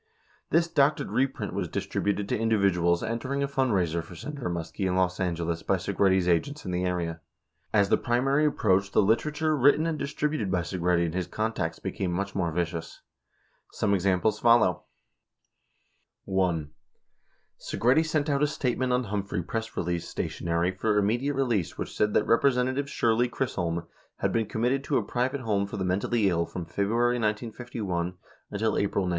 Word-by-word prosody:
83 - - +5
This 170 0 +2
doctored 150 -2 +2
reprint 135 +1 -1
was - - -2
distributed 100 0 -2
to - - 0
individuals 100 -6 +2
entering 130 +5 -2
a - - 0
fund 135 -2 0
raiser 85 -4 +1
for 85 - -12
Senator 140 - -5
Muskie 85 +3 -3
in 90 - 0
Los 90 -1 +1
Angeles 85 -2 -1
by 95 - +1
Segretti's 95 0 +2
agents 125 - 0
in 90 - -3
the 90 0 -1
area. 85 -2 -2 0.5
84 110 - +3
As 100 - +1
the - - +4
primary 135 +5 +1
approached, 100 -8 +1
the - - +5
literature 150 +9 +1
written 145 +3 +4
and 160 -2 -1
distributed 145 -5 -1
by 90 -2 +1
Segretti 90 -1 0
and 80 - -3
his 90 -1 -2
contacts 100 -6 -2
became 95 -2 -3
much 100 +3 -2
more 85 -4 -1
vicious. 85 0 -3 0.7
Some 100 -1 +1
exam 95 -1 +2
ples 110 -1 +1
follow: 110 -7 +4 1.4
1. 90 -6 0 0.9
Segretti 130 +7 +2
sent 155 -2 0
out 140 -1 +1
a 150 - +4
statement 130 -3 -1
on 125 +1 +2
Humphrey 100 -4 -3
press 115 +6 -4
release 85 0 -2
station - - -4
ery 85 +2 +1
for 105 +3 0
immediate 120 +8 +1
release 120 -10 0
which - - -5
said 105 0 +1
that 105 - +3
Representative 130 +3 +2
Shirley 120 0 +2
Chisholm 85 -10 -2 0.3
had - - 0
been 115 -2 0
committed 125 +6 0
to - - +1
a - - +1
private 130 +3 -1
home 100 -4 0
for 105 - -6
the 95 - -1
mentally 100 +4 +1
ill 85 -3 +1
from 90 -2 -6
February 115 +7 +1
1951, 105 -5 -2 0.3
until 110 +1 0
April 100 -1 0
1952. - - -1
105 Hz, 175 wpm, -27 LUFS, 90-125 Hz, 1.4 s, 83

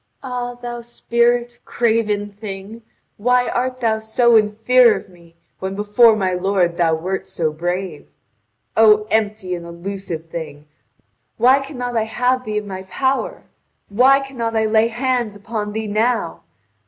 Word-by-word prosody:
Ah, 245 -2 -4
thou 240 0 -6
spirit, 240 0 0
craven 215 -3 0
thing! 205 +1 -8 0.4
Why 245 +3 +2
art 255 +1 -2
thou 220 -2 +1
so 230 +2 +3
in 210 -1 +3
fear 240 +1 +5
of - - -11
me, 170 -2 -20 0.2
when 190 +1 -4
before 210 +3 +4
my 190 -3 0
lord 180 -2 0
thou 165 -2 +2
weft 185 +4 -4
so 160 -2 -2
brave? 175 0 -4 0.7
O 215 -1 +6
empty 210 -4 0
and 175 -1 -5
elusive 170 -1 -6
thing, 155 -3 -7 0.7
why 260 +3 +5
cannot 250 -3 -5
I 220 -1 +1
have 250 +3 0
thee 215 -1 -2
in 210 -1 -3
my 190 -1 -6
power? 270 0 -1 0.5
Why 260 +6 +5
cannot 240 -4 -4
I 220 0 +2
lay 220 +1 +3
hands 240 -2 -1
upon 210 0 -5
thee 220 0 -3
now? 215 -3 0
220 Hz, 150 wpm, -19 LUFS, 195-240 Hz, 0.7 s, O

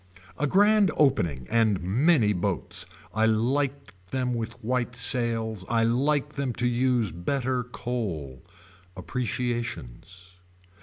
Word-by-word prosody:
A 150 - +1
grand 205 +3 +4
opening 85 - +2
and 110 -4 +2
many 115 - +3
boats. 90 - -2 0.3
I 110 +1 +2
like 135 +5 0
them 125 +3 -1
with 115 -1 -5
white 125 +1 -1
sails. 115 -3 +1
I 115 -1 +2
like 140 +5 +1
them 140 -4 -2
to 120 +2 -1
use 120 -3 +1
better 125 - -1
coal. 95 - -4 0.6
Appreciations. 95 - -4
120 Hz, 110 wpm, -26 LUFS, 105-130 Hz, 0.6 s, grand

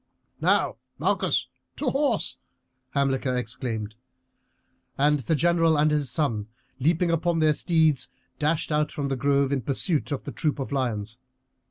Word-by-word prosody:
"Now, - - +2 0.2
Malchus, - - +1 0.3
to 295 - -4
horse!" 270 -6 0 0.6
Hamilcar 135 -2 +1
exclaimed. 115 -2 -3 1.0
And 150 +1 +3
the 160 +5 0
general 165 +1 +3
and 150 +1 +3
his 145 -3 +1
son, 120 -6 -1 0.3
leaping 165 +5 +2
upon 170 +1 +1
their 155 -1 +4
steeds, 160 -3 +2 0.3
dashed 155 +1 0
out 150 0 +1
from 140 -2 -3
the 135 - 0
grove 140 +1 +2
in 140 -2 0
pursuit 145 - 0
of 140 - -2
the 145 - -6
troop 150 +5 -1
of 135 -1 -5
lions. 120 -4 -2
145 Hz, 145 wpm, -26 LUFS, 130-160 Hz, 1.0 s, their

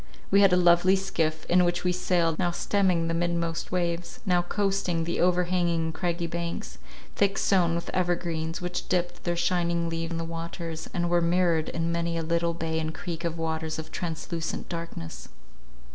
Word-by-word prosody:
We 200 +1 +6
had 195 -2 +6
a 180 - +5
lovely 175 +1 +5
skiff, 165 -5 -1
in 180 +1 +4
which 175 0 0
we 180 - +2
sailed, 175 -3 +1
now 175 -2 +2
stemming 180 -2 +1
the 165 - 0
midmost 170 -1 -1
waves, 175 -1 -2
now 180 -2 +3
coasting 195 -2 0
the 170 - -2
over 180 0 +4
hanging 175 -1 +1
and 160 0 -2
craggy 175 0 -1
banks, 170 0 -4 0.4
thick 200 -1 +2
sown 175 -4 +3
with 170 - -3
evergreens, 170 -2 -1
which 180 0 -4
dipped 175 -1 -1
their 175 -1 0
shining 170 -1 +1
leaves 165 0 -3
in 165 - -2
the 165 - -2
waters, 165 0 -5
and 175 -2 0
were 175 0 +4
mirrored 170 -2 +2
in 165 0 -1
many 170 0 -1
a 165 - -1
little 170 +1 0
bay 160 -1 -1
and 160 0 -3
creek 170 0 -5
of 170 -1 -2
waters 160 -1 -2
of 160 0 -7
translucent 165 -1 -4
darkness. 165 - -6
170 Hz, 185 wpm, -27 LUFS, 165-180 Hz, 0.4 s, We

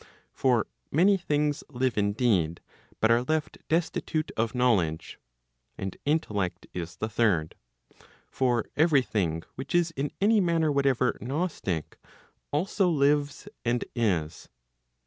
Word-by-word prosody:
For 125 -4 +2 0.3
many 185 +7 +5
things 150 -5 0
live 130 -2 -1
indeed, 100 -5 +1 0.4
but 110 - +3
are 115 +1 +4
left 155 +3 -2
destitute 160 -1 -1
of 115 +3 -1
knowledge. 95 -11 +1 0.6
And 95 -1 -4
intellect 105 - -1
is 85 -1 -5
the 110 - -3
third. 105 -8 +1 0.8
For 120 -3 +1
every 150 -2 +4
thing 85 -8 -1
which 135 +7 -5
is 170 -1 +3
in 145 -2 -2
any 210 +1 +4
manner 165 -3 +2
whatever 135 -3 +1
gnostic, 130 - -3 0.5
also 180 +5 +1
lives 145 +1 +1 0.2
and 120 0 0
is. 90 -10 -1
125 Hz, 120 wpm, -27 LUFS, 105-155 Hz, 0.8 s, many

